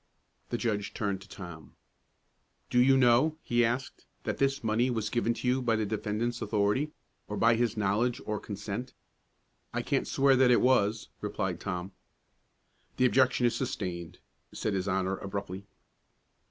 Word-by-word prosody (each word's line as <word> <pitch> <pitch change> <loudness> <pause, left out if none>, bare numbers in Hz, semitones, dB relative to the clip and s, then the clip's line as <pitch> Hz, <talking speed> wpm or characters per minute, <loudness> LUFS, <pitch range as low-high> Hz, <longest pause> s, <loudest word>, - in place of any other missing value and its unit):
The 120 - -1
judge 105 -4 -2
turned 100 -3 -2
to 100 - -14
Tom. 85 -4 -10 1.0
"Do 125 - +4
you 135 +1 +5
know," 130 +5 +4
he 120 0 +2
asked, 120 +3 -2 0.2
"that - - -3
this 135 0 +1
money 115 +3 +2
was 110 -3 -2
given 120 -1 +1
to 125 - -4
you 130 +1 +2
by 115 -2 +2
the 110 -1 0
defendant's 110 +3 -2
authority, 105 +8 +1 0.4
or 105 - -4
by 115 +2 +5
his 115 -1 0
knowledge 105 +4 +1
or 105 -1 -2
consent?" 105 +4 -6 0.8
"I - - 0
can't - - 0
swear 135 0 +4
that 130 -1 +5
it 120 - +6
was," 110 -4 +2
replied 95 -4 -2
Tom. 90 -1 -4 1.1
"The 130 - +4
objection 130 -1 +3
is 120 - +2
sustained," 90 - -4 0.3
said 110 - -2
his 95 0 -1
Honor, 95 0 0
abruptly. 100 -1 -6
110 Hz, 155 wpm, -30 LUFS, 100-125 Hz, 1.1 s, it